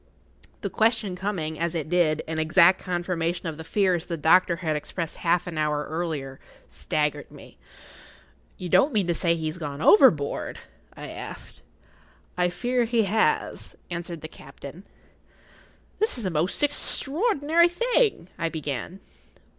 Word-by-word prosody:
The - - -2
question 220 -4 +1
coming, 180 -5 -3
as 170 0 -1
it 155 -3 -2
did, 160 -3 +2
in 160 0 -3
exact 170 +3 +5
confirmation 175 -1 -2
of 160 -2 -4
the - - -6
fears 180 -1 +1
the 170 - -3
doctor 170 +3 +4
had 165 -3 -2
expressed 165 +2 -5
half 175 +1 +1
an 170 -3 -5
hour 150 -1 0
earlier, 155 -5 -4 0.3
staggered 150 -1 -2
me. - - -15 1.0
"You 180 - -5
don't 275 - +4
mean 205 -4 +2
to 170 - +1
say 170 0 +1
he 160 -1 -4
has 155 +3 -4
gone 145 -3 -5
overboard?" 195 - +4 0.4
I - - -8
asked. - - -8 0.7
"I 180 0 +2
fear 245 +7 0
he 230 -1 +2
has," 215 +3 0 0.2
answered 170 -1 -5
the 155 - -6
captain. 140 +5 -12 1.1
"This 435 - 0
is 235 - -5
the 185 - -1
most 165 - -1
extraordinary 315 - +1
thing——" 455 - +1
I 165 - 0
began. 155 +3 -5
175 Hz, 145 wpm, -25 LUFS, 155-205 Hz, 1.1 s, exact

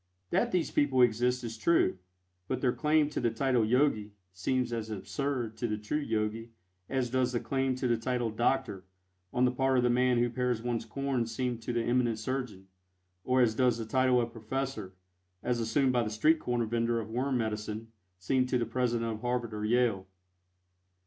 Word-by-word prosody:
That - - +2
these 180 -3 0
people 130 -3 +3
exist 125 +2 +2
is 115 -1 -6
true, 110 - +2 0.5
but 130 - -1
their 125 -2 +1
claim 150 -1 +2
to - - -2
the 120 - +2
title 125 +1 +1
"Yogi" 110 -3 +1 0.2
seems 125 +7 -1
as 110 -1 -3
absurd 120 +2 -3
to 120 - -1
the 105 -1 -2
true 110 +8 -2
Yogi 115 -3 -2 0.4
as 130 -3 -1
does 125 -1 +1
the 120 - +1
claim 135 0 -1
to 130 0 -1
the 120 -1 +2
title 120 0 -1
"Doctor" 120 -3 0 0.5
on 125 - +2
the 125 - +3
part 135 +1 +1
of 125 - +3
the 125 - +3
man 125 0 +3
who 120 0 +3
pares 125 -2 0
one's 120 0 -2
corns 135 -4 -2
seem 125 -2 -1
to 115 - -4
the 120 -1 0
eminent 120 -2 +1
surgeon, 110 -4 -4 0.6
or 130 0 +3
as 115 -3 +3
does 125 0 +2
the 115 - -4
title 130 +2 +3
of 120 -1 -1
"Professor," 115 -3 -4 0.5
as 120 -1 0
assumed 125 +4 +2
by 120 - +3
the 110 - -2
street 155 +10 +3
corner 120 -4 -1
vendor 115 +1 0
of 110 -1 -6
worm 130 +3 0
medicine, 110 0 -3 0.3
seem 130 +8 +1
to 125 - +1
the 120 - 0
President 115 -1 -1
of 110 0 -6
Harvard 120 -2 -2
or 105 0 -4
Yale. 110 -4 +1
120 Hz, 195 wpm, -30 LUFS, 110-130 Hz, 0.6 s, people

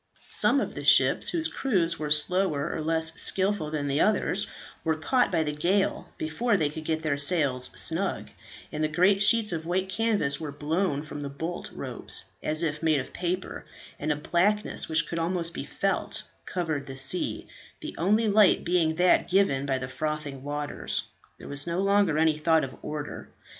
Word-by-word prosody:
Some - - +2
of - - -3
the - - -6
ships - - +5
whose 325 -2 0
crews 175 -10 0
were 150 -1 -3
slower 150 0 +1
or - - -3
less 160 0 0
skilful 190 -5 +1
than 150 -2 -2
the 140 +1 +1
others, 215 - +2 0.4
were 160 -1 +1
caught 250 +11 +1
by 160 - +2
the 150 - -2
gale 180 +7 0
before 205 +8 0
they 150 -4 0
could 155 +1 -8
get 160 0 -1
their 145 -3 0
sails 140 -5 +2
snug, 185 +4 -1 0.4
and 155 0 -2
the - - +3
great 180 +6 +3
sheets 215 -1 +5
of 165 -1 -4
white 185 +2 -1
canvas 200 -9 0
were 155 -3 -5
blown 150 +1 -1
from 150 -1 -7
the 140 - -4
bolt 160 +5 -5
ropes - - -4 0.2
as 155 +2 0
if 155 -2 -2
made 155 -3 +2
of 130 - -7
paper, 180 +1 -3 0.4
and 150 +1 -1
a - - +1
blackness 180 +9 0
which 160 0 +2
could 170 - -3
almost 170 0 -1
be - - -5
felt, - - -1 0.2
covered 155 -6 -2
the 135 -1 -8
sea, 135 +7 -1 0.3
the 310 - -6
only 210 +6 +2
light 205 -1 +5
being 170 -3 +1
that 180 +2 +3
given 175 -8 +2
by 135 -1 +1
the 130 0 -5
frothing 150 0 -4
waters. 145 +1 -3 0.3
There - - -11
was 140 +3 -1
no 170 +1 -1
longer 195 -4 +3
any 155 -1 +2
thought 160 +1 +3
of 130 -1 -5
order. 150 -1 -6
160 Hz, 185 wpm, -27 LUFS, 150-185 Hz, 0.4 s, ships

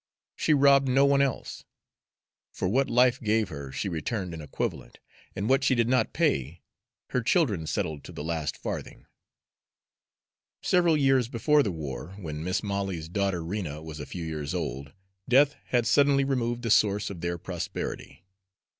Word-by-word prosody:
She 155 - +2
robbed 140 -1 +5
no 135 +2 +4
one 140 0 +4
else. 135 -3 -2 0.9
For - - -2
what 135 +8 +1
life 125 +3 +3
gave 110 -2 +1
her 70 -3 -7
she 70 +9 -3
returned 90 +2 -3
an 80 - -7
equivalent; 75 - -4 0.4
and 100 +3 -2
what 135 +2 +3
she 130 - +3
did 115 -1 +2
not 125 -3 +2
pay, 70 +6 0 0.5
her 125 - 0
children 115 - +1
settled 75 -2 -2
to - - -9
the 75 - -7
last 80 -3 -2
farthing. - - -6 1.6
Several 175 -3 +3
years 135 -4 +3
before 145 +5 +3
the 105 - 0
war, 80 +2 -6
when 80 -5 -6
Mis' 90 +5 -1
Molly's 95 -5 -3
daughter 95 -2 -1
Rena 85 -5 -4
was 80 -1 -8
a 70 - -6
few 90 - -6
years 75 -3 -4
old, 70 +3 -4 0.4
death 140 +3 +5
had 120 -2 +1
suddenly 140 +3 +4
removed 120 -3 -1
the 115 - -1
source 105 -1 +3
of 90 -4 -8
their 85 0 -2
prosperity. 90 0 -6
100 Hz, 165 wpm, -27 LUFS, 80-130 Hz, 1.6 s, robbed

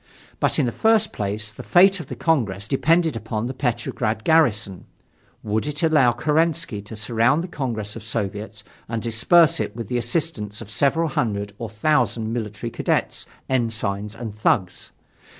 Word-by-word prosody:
But - - +1
in - - +3
the 120 - -1
first 220 - +2
place, 105 +1 -2
the 110 - -10
fate 190 +2 +5
of 160 - -8
the - - -6
Congress 105 - 0
depended 160 +4 +2
upon 110 0 -3
the 130 - -3
Petrograd 120 -4 -2
garrison: 110 - +2 0.6
would 110 +5 -1
it 150 +2 -2
allow 150 -7 +4
Kerensky 155 -4 0
to 110 - -9
surround 115 +8 +1
the - - -5
Congress 115 - -4
of 115 - -8
Soviets 105 0 -4 0.3
and 115 0 -2
disperse 160 +9 +4
it - - -3
with 115 -4 -6
the 125 - 0
assistance 120 - -2
of 110 -2 -9
several 145 +9 +2
hundred 105 -9 -2
or 115 - -5
thousand 115 -2 0
military 110 0 -4
cadets, - - -1 0.2
ensigns 110 -4 -1
and 115 -3 -6
thugs? 95 -3 0
115 Hz, 160 wpm, -22 LUFS, 105-150 Hz, 0.6 s, fate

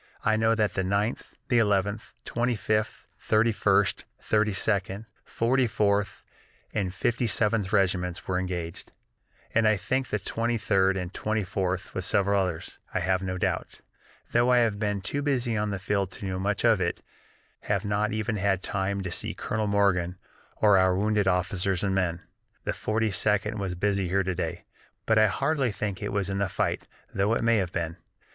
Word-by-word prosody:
I 110 - +4
know 110 +1 +3
that 105 -4 +1
the 95 - -1
Ninth, 100 +4 -1 0.2
Eleventh, 105 -2 +1
Twenty 120 +1 0
fifth, 110 +1 -1
Thirty 110 +2 +2
first, 100 -3 +2
Thirty 110 0 +1
second, 100 +1 0 0.2
Forty 125 +2 +1
fourth, 100 -2 0 0.5
and 100 -4 -1
Fifty 120 +5 0
seventh 105 -3 +1
Regiments 90 -3 +1
were 90 -1 0
engaged, 90 -3 -5 0.6
and 115 -1 +4
I 110 -1 +4
think 130 +6 -1
the 105 - -1
Twenty 115 +3 -1
third 95 -2 +2
and 90 0 -4
Twenty 110 0 -1
fourth, 95 0 -2
with 95 - -3
several 100 +1 +2
others, 90 -4 -4
I - - 0
have 95 0 +1
no 95 -1 -3
doubt, - - -2 0.5
though 120 +2 +3
I 125 - +5
have 115 -4 +2
been 105 -2 -1
too 140 +9 -2
busy 130 -5 0
on 105 0 0
the 100 - -2
field 100 0 -1
to - - -7
know 95 -1 -2
much 100 +3 0
of 110 -4 +4
it 85 - -2 0.6
have 100 0 0
not 105 +1 0
even 110 +1 -1
had 95 -2 +1
time 100 0 -1
yet - - -5
to 90 - -4
see - - -4
Colonel 110 0 -2
Morgan 95 -3 +1 0.4
or 105 -3 +5
our 95 0 +3
wounded 105 0 +1
officers 90 0 +1
and 100 -1 +1
men. 90 -3 0 0.4
The - - -1
Forty 110 0 -1
second 105 +2 +1
was 95 -2 -3
busy 100 0 0
here 95 +2 +1
to 95 0 -1
day, 85 -1 -4 0.4
but 110 -1 +4
I 110 - +6
hardly 135 +3 0
think 100 -1 -4
it 105 - -3
was 100 -2 -1
in 100 0 -2
the 100 -1 0
fight, - - -1 0.3
though 100 +4 +2
it - - -1
may 115 0 +4
have 95 -4 -1
been. 85 0 -3
100 Hz, 185 wpm, -27 LUFS, 95-110 Hz, 0.6 s, I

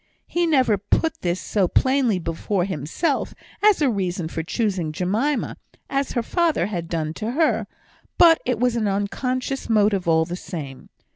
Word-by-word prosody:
He 345 0 0
never 260 - +3
put 320 +10 0
this 175 +1 -1
so 195 -4 0
plainly 260 -1 +2
before 175 +2 -2
himself, 190 - -2 0.3
as 415 -6 +4
a 275 - +4
reason 180 -5 -2
for 165 - -3
choosing 185 -2 -1
Jemima, 210 - -1 0.3
as 275 0 -1
her 240 - 0
father 340 +4 +1
had 175 -5 -4
done 155 -2 -2
to 220 +6 -4
her; 320 +3 +1 0.5
but 335 -2 +6
it 250 -3 -1
was 245 -1 +2
an 220 -3 0
unconscious 250 +7 -2
motive 205 -4 +2
all 160 -1 +4
the 175 - -5
same. 155 -8 -8
210 Hz, 160 wpm, -23 LUFS, 175-265 Hz, 0.5 s, but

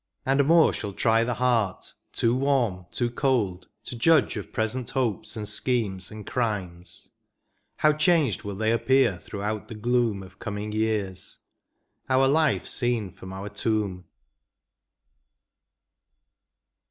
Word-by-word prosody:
And 135 +1 +2
more 165 0 +5
shall 100 - -4
try 115 +3 +3
the 120 0 -1
heart; 115 -6 0 0.2
too 115 - +1
warm, 125 -10 0
too 120 -1 -1
cold. 110 -9 0 0.2
To - - -7
judge 150 +4 +3
of 105 - -6
present 115 +2 -2
hopes, 125 -4 -2
and 105 -1 -4
schemes, 105 -3 0
and 105 -1 -9
crimes; 95 -8 -4 0.7
How 155 0 +3
changed 155 - +2
will 100 -1 -6
they 110 +2 +1
appear 125 -5 +3
throughout 105 +4 -4
the 115 - -8
gloom 115 -2 0
Of 95 0 -15
coming 105 +1 -4
years— 105 -3 -2 0.7
our 130 +1 +4
life 155 +1 +2
seen 120 -6 -1
irom 95 -1 -10
our 95 +2 -6
tomb 100 -3 -2
110 Hz, 130 wpm, -26 LUFS, 100-125 Hz, 0.7 s, more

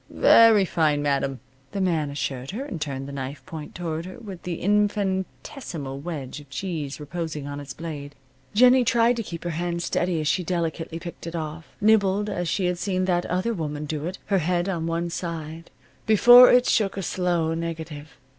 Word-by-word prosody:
"Very 225 -4 +6
fine, 155 -4 +1
madam," 140 -3 0 0.3
the 200 - -2
man 165 -6 +1
assured 135 -2 -4
her, 245 +8 -4
and 185 - -6
turned 135 -2 -4
the - - -7
knife 135 0 -6
point 155 -1 -8
toward 170 -1 -4
her, 185 - -9
with 200 -7 -9
the 175 -1 -4
infinitesimal 195 - -1
wedge 145 -4 -6
of 145 -2 -15
cheese 150 -2 -4
reposing 155 -1 -5
on 145 0 -5
its 140 -2 -8
blade. 145 -3 -7 0.4
Jennie 250 +3 +6
tried 235 +1 +3
to - - -1
keep 170 -6 -7
her 175 - -2
hand 170 +1 -2
steady 175 -2 0
as 155 - -2
she 180 +4 +1
delicately 165 -1 -2
picked 170 0 -8
it 165 - -5
off, 160 0 -5
nibbled 210 -1 +3
as 175 -1 -2
she 185 +4 0
had 180 -1 -1
seen 185 -1 0
that 175 -1 0
other 185 +6 0
woman 150 -5 -4
do 150 +1 -3
it, 185 - -5
her 195 -2 +2
head 175 +2 0
on 170 -4 -2
one 170 +1 -2
side, 165 -1 -5 0.4
before 245 +3 +9
it 250 0 +5
shook 200 -3 +1
a 195 - -2
slow 175 -3 0
negative. 160 -2 -6
170 Hz, 190 wpm, -25 LUFS, 150-190 Hz, 0.4 s, before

